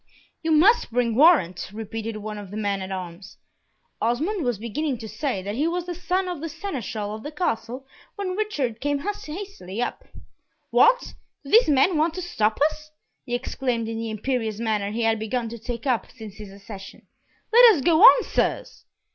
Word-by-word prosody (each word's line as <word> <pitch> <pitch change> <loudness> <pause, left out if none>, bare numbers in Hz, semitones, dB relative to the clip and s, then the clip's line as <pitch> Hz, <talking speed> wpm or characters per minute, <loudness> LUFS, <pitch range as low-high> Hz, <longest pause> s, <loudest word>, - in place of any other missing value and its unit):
"You 325 - -2
must 405 +10 +5
bring 235 -1 +1
warrant," 245 - +4
repeated 220 +1 -5
one 210 0 -6
of 200 -2 -9
the 205 - -7
men 200 -2 -1
at 190 0 -6
arms. 180 0 -7 0.6
Osmond 310 - 0
was 245 -4 0
beginning 255 +6 -3
to 225 -1 -8
say 220 -5 -3
that 200 +2 -4
he 290 +8 0
was 345 +1 -2
the 355 - -4
son 365 +2 -1
of 350 -5 -5
the 330 - -4
Seneschal 255 - -5
of 215 - -7
the 295 - -7
Castle, 260 -5 -3 0.3
when 385 -3 -3
Richard 290 - -2
came 290 0 0
hastily 355 - -6
up. 245 - -3 0.7
"What? - - +4 0.3
Do 275 - -10
these 460 -5 +6
men 295 +5 +4
want 320 +1 +1
to 365 - -4
stop 215 -11 0
us?" 305 0 -13 0.4
he 245 - -1
exclaimed 245 -2 -2
in 225 0 -4
the 225 0 -3
imperious 220 0 -2
manner 215 -3 -1
he 225 +3 -2
had 225 -1 +2
begun 230 +2 -2
to 235 +1 -8
take 235 +2 -6
up 250 -4 0
since 220 -5 -11
his 210 -3 -10
accession. 195 -1 -11 0.5
"Let 475 -2 +9
us 290 - -2
go 335 -1 +4
on, - - +9
sirs." - - -2
245 Hz, 190 wpm, -24 LUFS, 215-325 Hz, 0.7 s, Let